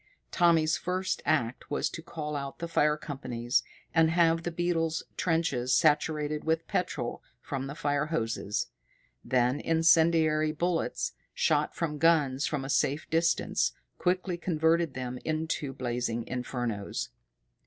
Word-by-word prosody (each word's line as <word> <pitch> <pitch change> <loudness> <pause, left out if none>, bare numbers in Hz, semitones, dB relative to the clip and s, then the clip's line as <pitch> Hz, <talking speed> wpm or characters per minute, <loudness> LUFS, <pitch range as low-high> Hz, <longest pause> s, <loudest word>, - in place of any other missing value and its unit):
Tommy's 165 -3 +4
first 185 +2 -2
act 125 -5 0
was 145 - 0
to 165 - -6
call 150 -2 -5
out 140 -1 -4
the 170 - -4
fire 150 -2 +2
companies 125 -5 -1 0.3
and 165 -1 +5
have 165 0 +3
the 175 - -2
beetles' 165 -1 0
trenches 160 -8 +1
saturated 150 0 +2
with 160 +1 0
petrol 120 -9 -2 0.2
from 135 +1 -4
the 140 - -6
fire 145 0 0
hoses. 115 -8 -2 0.5
Then 125 +2 +2
incendiary 160 -1 +3
bullets, 170 +1 -1 0.2
shot 150 -1 +1
from 150 -3 -2
guns 145 -4 +3
from 140 -3 -2
a - - -4
safe 145 +3 +1
distance, 165 0 +2 0.3
quickly 180 0 0
converted 165 -3 +1
them 125 -1 -4
into 155 -3 -2
blazing 120 -3 -2
infernos. 120 -5 -3
155 Hz, 130 wpm, -29 LUFS, 135-165 Hz, 0.5 s, and